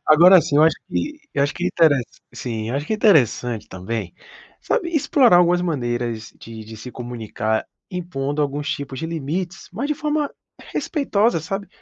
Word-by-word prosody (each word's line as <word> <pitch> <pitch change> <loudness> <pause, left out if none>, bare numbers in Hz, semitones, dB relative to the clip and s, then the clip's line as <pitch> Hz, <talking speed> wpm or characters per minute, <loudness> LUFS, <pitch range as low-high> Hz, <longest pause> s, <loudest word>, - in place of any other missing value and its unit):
agora, 175 +5 +8
assim, 145 -3 +1
eu 150 - +6
acho 160 0 +4
que - - -4
e 300 +1 -4
eu 140 - +2
acho 145 - 0
que 180 - -3
intere 165 -4 +4 0.4
sim, 115 -2 -4
acho 140 +4 -2
que 220 - 0
interessante 125 - +2
também, 95 +1 -5 0.5
sabe 425 -9 0
explorar 270 - +5
algumas 175 0 +4
maneiras 120 -8 -2
de 110 -1 -9
de 110 +1 -10
se 110 +4 -8
comunicar, 110 -3 -3 0.2
impondo 150 -6 -2
alguns 145 0 -2
tipos 135 -2 -4
de 160 - -3
limites, 170 +4 -4
mas 235 +9 -2
de 300 - +1
forma 300 -1 -1 0.4
respeitosa, 230 - +1
sabe. 195 +5 -4
155 Hz, 170 wpm, -21 LUFS, 120-190 Hz, 0.5 s, agora